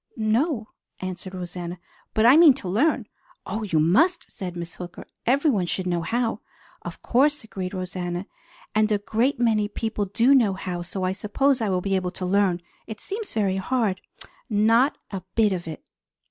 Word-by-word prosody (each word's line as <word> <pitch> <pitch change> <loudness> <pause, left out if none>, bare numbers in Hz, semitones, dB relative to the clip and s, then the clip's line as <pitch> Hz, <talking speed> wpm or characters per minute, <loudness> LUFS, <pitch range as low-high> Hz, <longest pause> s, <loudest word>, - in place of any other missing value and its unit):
"No," 225 +2 0 0.3
answered 185 0 -6
Rosanna, 175 -1 -6 0.4
"but 220 - +3
I 250 +4 +8
mean 315 -5 +8
to 230 - -7
learn." 240 - +2 0.4
"Oh, 210 +4 -3
you 185 -7 0
must!" 310 - +3
said 180 -2 -6
Miss 170 0 -6
Hooker. 180 -1 -8 0.2
"Everyone 255 - +2
should 185 +1 -2
know 175 -2 0
how." 230 +6 -1 0.4
"Of - - -9
course," 290 +3 +2
agreed 190 -3 -5
Rosanna. 180 0 -4 0.5
"And 215 0 +2
a 210 - +3
great 230 +6 0
many 220 -3 +2
people 215 -1 -2
do 230 +7 +3
know 230 -8 +4
how, 185 -2 -4
so 185 +2 -5
I 185 - +1
suppose 245 +7 +1
I 215 - 0
will 185 -1 +1
be 195 +1 0
able 185 -1 0
to 185 - -3
learn. 185 -2 +2 0.2
It 220 -2 -7
seems 420 +2 -5
very 195 -3 +1
hard." 205 -2 0 0.5
"Not 230 +6 +3
a 195 -2 -4
bit 215 -3 +3
of 175 -2 -4
it!" 155 -2 -7
205 Hz, 175 wpm, -24 LUFS, 185-235 Hz, 0.5 s, I